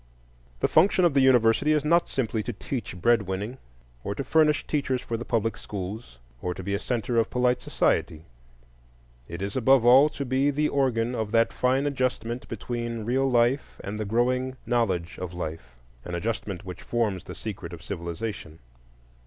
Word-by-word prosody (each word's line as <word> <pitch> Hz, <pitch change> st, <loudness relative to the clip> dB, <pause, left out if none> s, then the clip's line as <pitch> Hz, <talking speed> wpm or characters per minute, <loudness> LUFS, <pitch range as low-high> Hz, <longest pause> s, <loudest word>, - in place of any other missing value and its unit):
The -, -, +3 dB
function 185 Hz, -2 st, +4 dB
of 170 Hz, -, +3 dB
the 135 Hz, -, +4 dB
university 130 Hz, +3 st, +4 dB
is 150 Hz, -1 st, +1 dB
not 170 Hz, +2 st, +3 dB
simply 115 Hz, -4 st, -1 dB
to 120 Hz, +3 st, -4 dB
teach 105 Hz, -4 st, -5 dB
bread 115 Hz, +4 st, +4 dB
winning, 105 Hz, +7 st, -4 dB, 0.4 s
or 100 Hz, -, -3 dB
to 140 Hz, -, -3 dB
furnish 155 Hz, 0 st, +3 dB
teachers 140 Hz, -4 st, 0 dB
for 115 Hz, -, -4 dB
the 120 Hz, +1 st, -5 dB
public 115 Hz, -1 st, 0 dB
schools 100 Hz, -, -7 dB, 0.2 s
or 90 Hz, -1 st, -2 dB
to 95 Hz, -, -7 dB
be 100 Hz, +2 st, -2 dB
a 100 Hz, -, 0 dB
centre 120 Hz, 0 st, -1 dB
of 115 Hz, -, +1 dB
polite 125 Hz, 0 st, +1 dB
society; 80 Hz, +1 st, 0 dB, 1.0 s
it 85 Hz, +3 st, -6 dB
is, 100 Hz, +1 st, -4 dB
above 130 Hz, -1 st, +4 dB
all, 130 Hz, +5 st, +7 dB
to 140 Hz, -2 st, -5 dB
be 135 Hz, +2 st, +2 dB
the 150 Hz, +2 st, +1 dB
organ 125 Hz, -4 st, +1 dB
of 110 Hz, -3 st, -3 dB
that 115 Hz, 0 st, +3 dB
fine 130 Hz, +2 st, +1 dB
adjustment 130 Hz, -3 st, -2 dB
between 120 Hz, -2 st, -4 dB
real 135 Hz, +3 st, +1 dB
life 120 Hz, +2 st, +1 dB
and 105 Hz, +2 st, -5 dB
the 110 Hz, -, -2 dB
growing 125 Hz, +4 st, 0 dB
knowledge 95 Hz, -9 st, 0 dB
of 90 Hz, -1 st, -5 dB
life, 80 Hz, -7 st, -6 dB, 0.3 s
an 90 Hz, -, -5 dB
adjustment 100 Hz, 0 st, -3 dB
which 90 Hz, -1 st, -8 dB
forms 105 Hz, -6 st, -1 dB
the -, -, -8 dB
secret 100 Hz, -5 st, -6 dB
of 85 Hz, -, -9 dB
civilization. 85 Hz, -2 st, -5 dB
115 Hz, 175 wpm, -26 LUFS, 100-130 Hz, 1.0 s, all